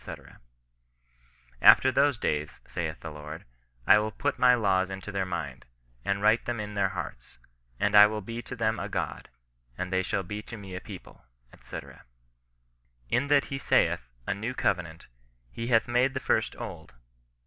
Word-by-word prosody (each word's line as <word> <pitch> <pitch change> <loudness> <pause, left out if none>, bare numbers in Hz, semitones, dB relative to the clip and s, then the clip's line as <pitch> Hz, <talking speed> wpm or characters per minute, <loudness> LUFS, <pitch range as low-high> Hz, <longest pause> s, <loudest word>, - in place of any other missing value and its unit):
After 130 - +8
those 140 -1 +3
days, 75 -6 -2
saith - - -4
the 80 - -6
Lord, 75 +1 -9 0.4
I 105 - +7
will 105 +1 -1
put 140 +7 -2
my 125 0 +6
laws 95 -5 +1
into 95 +1 -6
their 95 -1 -1
mind, 75 -9 -5 0.4
and 100 0 -1
write 110 +2 +4
them 120 -2 -2
in 105 0 -5
their 100 -1 +1
hearts; 95 - -7 0.4
and 105 - +1
I 105 0 +10
will 105 0 -4
be 115 +4 -6
to 125 - -8
them 110 -1 0
a - - -4
God, - - -4 0.5
and 90 +1 -4
they 95 - +3
shall 95 +1 -2
be 105 +4 -5
to 115 +2 -9
me 100 -3 -9
a 90 - -5
people," - - -11 0.4
&c. - - -7 0.7
" - - -40
In 125 +4 +2
that 145 -1 +4
he 135 - -5
saith, 60 - +2 0.2
a - - 0
new 110 +6 -4
covenant, 85 -8 -1 0.5
he 115 - -5
hath 115 -2 +3
made 125 +3 +2
the - - 0
first - - 0
old. - - -8
105 Hz, 175 wpm, -28 LUFS, 85-115 Hz, 0.7 s, I